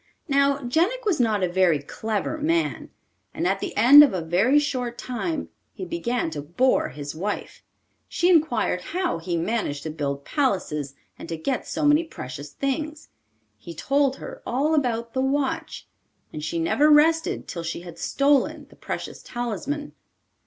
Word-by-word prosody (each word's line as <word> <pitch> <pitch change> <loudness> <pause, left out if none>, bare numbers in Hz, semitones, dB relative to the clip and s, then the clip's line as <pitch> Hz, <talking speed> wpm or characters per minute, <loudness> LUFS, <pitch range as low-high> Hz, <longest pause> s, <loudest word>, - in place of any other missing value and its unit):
Now 280 -1 +3
Jenik 350 - 0
was 380 -8 +1
not 220 -5 +2
a - - +3
very 175 -3 +3
clever 215 - -3
man, 330 +2 0 0.5
and - - -2
at 195 +1 +1
the - - -5
end 265 +7 +10
of 270 -10 +2
a 180 - -1
very 190 - +3
short 255 -5 -1
time 285 +5 -3 0.2
he 375 - -6
began 245 - -2
to 150 -2 -4
bore 175 - +1
his 145 +2 -7
wife. 200 +6 -5 0.5
She 350 - +1
inquired 315 - +2
how 350 - -2
he 170 +1 -2
managed 165 -6 -2
to 160 - -4
build 140 -2 -3
palaces 155 - -1 0.2
and - - -9
to 165 - -3
get 245 +11 -2
so 305 - -2
many 295 +3 +5
precious 145 - -8
things. 300 +3 -3 0.5
He 170 +8 -10
told 275 - +1
her - - -9
all 280 +6 0
about 235 -6 0
the 260 - 0
watch, 270 0 -2 0.5
and 150 - -6
she 160 +2 -2
never 260 - +3
rested 320 +2 +3
till 170 - -5
she 165 +1 -4
had 175 -2 -11
stolen 280 0 +1
the - - -16
precious - - -6
talisman. 245 +5 -4
245 Hz, 165 wpm, -24 LUFS, -, 0.5 s, end